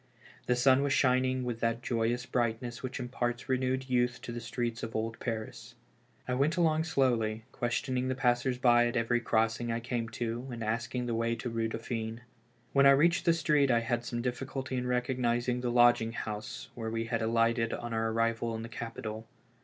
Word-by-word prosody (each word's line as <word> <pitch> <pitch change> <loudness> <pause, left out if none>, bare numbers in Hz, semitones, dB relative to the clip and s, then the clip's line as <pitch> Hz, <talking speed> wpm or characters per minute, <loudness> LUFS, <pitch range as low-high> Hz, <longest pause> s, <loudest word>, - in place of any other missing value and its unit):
The 125 - +3
sun 130 +2 +4
was 140 -1 +1
shining 130 0 +2
with 120 -2 -3
that 115 +1 -1
joyous 120 +1 0
brightness 120 0 -2
which 130 0 -5
imparts 120 -1 -3
renewed 130 0 0
youth 125 -1 +1
to - - -5
the 120 - -4
streets 115 0 -3
of 115 - -6
old 115 +1 -2
Paris. 115 +1 -5 0.5
I 125 - -1
went 145 +7 +1
along 160 -2 +2
slowly, 115 -8 +1
questioning 125 +1 -1
the 130 - -1
passers 125 -1 +1
by 120 -1 +5
at 120 - -3
every 115 +1 +2
crossing 115 +1 +1
I 115 - -1
came 120 -1 -3
to, 120 +2 -4
and 115 -1 -5
asking 115 +3 -2
the 120 - -2
way 115 +1 0
to 120 - -4
the 115 0 -2
Eue 115 - +1
Dauphine. 115 0 -4 0.5
When 140 0 +6
I 140 0 +7
reached 170 +4 +3
the 170 - +6
street 150 -4 +2
I 120 -2 +4
had 120 0 -1
some 120 0 -3
difficulty 130 +1 -3
in 125 0 -2
recognizing 125 -1 0
the 125 - -1
lodging 120 -1 +4
house 105 -2 -5
where 115 -2 -4
we 115 0 -2
had 115 0 -1
alighted 115 +1 +2
on 120 -1 -4
our 115 0 0
arrival 115 0 0
in 110 - -5
the 115 - -7
capital. 115 -1 -6
120 Hz, 195 wpm, -31 LUFS, 115-125 Hz, 0.5 s, I